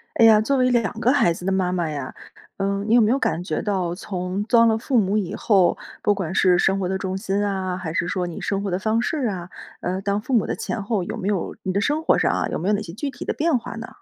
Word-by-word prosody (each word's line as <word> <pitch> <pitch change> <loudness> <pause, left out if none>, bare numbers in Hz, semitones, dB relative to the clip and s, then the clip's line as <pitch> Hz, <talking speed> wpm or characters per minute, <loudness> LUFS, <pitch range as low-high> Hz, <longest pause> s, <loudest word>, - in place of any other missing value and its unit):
哎 230 - +6
呀， 215 -1 +7
作 275 +5 +1
为 255 0 +3
2 235 -4 +1
个 250 - +3
孩 265 -12 +3
子 175 +2 -9
的 195 - +1
妈 185 -1 +1
妈 175 -3 -1
呀， 140 -4 -5 0.4
嗯， 200 +1 -1
你 230 - +5
有 245 - +6
没 220 +1 +3
有 275 - +2
感 175 -6 -1
觉 - - -2
到 185 -4 -1
从 185 +1 -3
当 230 +1 +4
了 220 -1 +3
父 245 +2 +1
母 200 0 +1
以 195 -5 -2
后， 195 -5 +3 0.2
不 205 - +3
管 185 -4 -4
是 180 -1 +4
生 190 +2 +2
活 185 - -1
的 190 - 0
重 190 0 -3
心 195 +1 -1
啊， 190 -2 -2
还 170 -4 -5
是 170 - 0
说 180 -2 -1
你 170 - -7
生 195 -1 -1
活 200 - -2
的 180 - 0
方 220 +3 +1
式 275 0 -1
啊， 180 -3 -5 0.3
呃， 185 +1 -2
当 200 +1 -1
父 260 - -4
母 230 - +3
的 - - -2
前 215 - -4
后， 200 -2 -1
有 - - -5
没 190 - -4
有- 200 -4 -1
你 185 - -1
的 200 - +1
生 295 +6 0
活 - - +4
上 - - +2
啊- - - 0
有 - - -2
没 175 - -3
有 210 - +3
哪 205 - 0
些 165 - -8
具 265 +9 -3
体 - - -8
的 - - -1
变 315 -3 +1
化 230 - -7
呢？ 225 -1 -6
200 Hz, 310 characters per minute, -23 LUFS, 185-225 Hz, 0.4 s, 呀